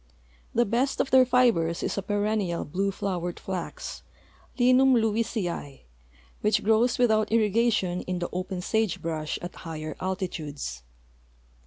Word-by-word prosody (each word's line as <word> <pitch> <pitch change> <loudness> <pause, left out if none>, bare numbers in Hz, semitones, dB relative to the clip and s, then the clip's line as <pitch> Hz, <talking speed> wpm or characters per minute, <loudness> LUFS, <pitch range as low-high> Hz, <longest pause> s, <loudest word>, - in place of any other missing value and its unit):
The 240 - +4
best 245 +6 0
of - - 0
their 260 -1 +6
fibers 235 -10 +3
is - - -1
a 200 - -1
perennial 205 -3 -1
blue 195 +6 -1
liowered 180 -3 -3
flax, 185 -2 -5 0.6
Linum 255 +1 +5
lewisii, 215 - -1 0.6
which 210 - +2
grows 225 +3 +3
without 220 -3 +3
irrigation 215 -4 +2
in 185 0 -1
the 175 0 -2
open 185 0 -3
sage 220 -1 0
brush 155 -2 -3
at 175 - -5
higher 155 -2 -6
altitudes. 160 - -4
200 Hz, 130 wpm, -27 LUFS, 175-230 Hz, 0.6 s, their